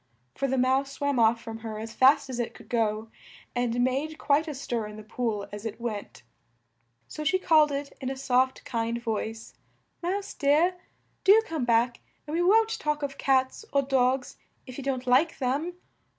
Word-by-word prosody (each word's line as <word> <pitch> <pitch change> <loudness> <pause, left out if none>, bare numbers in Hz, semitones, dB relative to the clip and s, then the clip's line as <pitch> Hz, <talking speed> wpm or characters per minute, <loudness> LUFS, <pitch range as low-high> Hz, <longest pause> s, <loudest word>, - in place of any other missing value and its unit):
For 275 - -1
the 265 0 0
Mouse 265 +2 +2
swam 285 -3 0
off 230 0 +4
from 225 0 -7
her 220 -1 -6
as 220 +1 -6
fast 270 +2 +5
as 255 -2 -5
it 240 - -3
could - - -15
go, 220 -1 0 0.5
and 245 0 0
made 280 +5 -1
quite 300 +3 +2
a 305 - -4
stir 240 -5 -3
in 210 - -9
the 215 - -9
pool 215 -2 -3
as 205 0 -7
it 225 0 -5
went. 220 -4 -5 0.8
So 305 - -6
she 315 +5 +3
called 310 -5 +4
it 280 0 -4
in 260 - -2
a 270 - -4
soft, 260 0 +1
kind 230 0 -2
voice, 225 -1 -4 0.5
"Mouse 390 +3 -2
dear! 305 +6 +3 0.5
Do 400 +3 +7
come 315 - -2
back 235 +1 +2 0.3
and 300 - -6
we 340 - +1
won't 445 +5 +3
talk 300 -1 -1
of 275 -1 -4
cats 260 +6 +1
or 280 0 +2
dogs 260 -1 +1 0.3
if 255 0 -8
you - - -6
don't 260 -2 -2
like 260 +6 +3
them!" 285 +7 -1
260 Hz, 190 wpm, -27 LUFS, 235-290 Hz, 0.8 s, Do